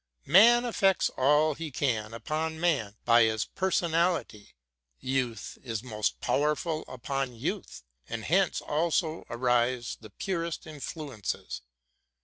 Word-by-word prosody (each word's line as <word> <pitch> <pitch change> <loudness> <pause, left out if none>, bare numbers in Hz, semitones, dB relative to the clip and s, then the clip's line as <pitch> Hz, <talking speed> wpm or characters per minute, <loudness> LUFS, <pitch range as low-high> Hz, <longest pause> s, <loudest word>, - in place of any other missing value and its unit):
Man 235 - +7
effects 195 -5 +2
all 150 +4 +3
he 160 +2 -6
can 115 -6 -1
upon 160 +5 -3
man 135 -12 0
by 120 0 +6
his 110 -1 0
personality, 170 - 0 0.4
youth 130 -3 -2
is 115 -3 -4
most 110 -4 -2
powerful 150 +2 0
upon 130 0 -3
youth, 115 - -4 0.3
and 115 -1 -4
hence 185 - +2
also 160 +1 0
arise 120 0 +1
the 110 - -11
purest 170 - -3
inilu 150 -5 -7
ences. 95 - -4
145 Hz, 120 wpm, -29 LUFS, 120-165 Hz, 0.4 s, Man